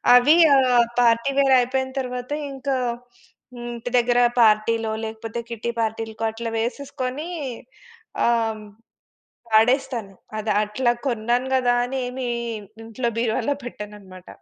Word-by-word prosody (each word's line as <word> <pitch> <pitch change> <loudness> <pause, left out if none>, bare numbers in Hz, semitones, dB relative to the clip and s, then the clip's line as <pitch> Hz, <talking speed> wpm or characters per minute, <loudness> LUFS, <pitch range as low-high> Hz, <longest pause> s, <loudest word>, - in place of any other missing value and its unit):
అవి 275 +6 +6 0.2
ఆహ్, 250 -3 +4 0.2
party 235 +3 +3
wear 270 -1 +4
అయిపోయిన 260 +1 -1
తర్వాత 250 +1 -6 0.2
ఇంకా 270 0 -2 0.8
హ్మ్. 240 0 -7
ఇంటి 235 +1 -6
దగ్గర 245 0 +3 0.2
పార్టీలో, 220 +1 +2
లేకపోతే 225 +1 -6
కిట్టి 235 +1 -3
పార్టీలకో 225 0 -3
అట్లా 230 +1 -5
వేసేసుకొని 260 +4 -4 1.0
ఆహ్, 235 -1 +3
హ్మ్, 215 - -11 0.9
వాడేస్తాను. 230 -2 +2 0.3
అది 215 0 -1
అట్లా 240 +4 0 0.2
కొన్నాను 240 +2 0
గదా 245 -1 +3
అని 265 +2 -4
ఏమి 250 0 -4 0.6
ఇంట్లో 230 +2 -3
బీరువాలో 240 +5 0
పెట్టనన్నమాట. 205 -5 -10
240 Hz, 115 wpm, -23 LUFS, 225-255 Hz, 1.0 s, అవి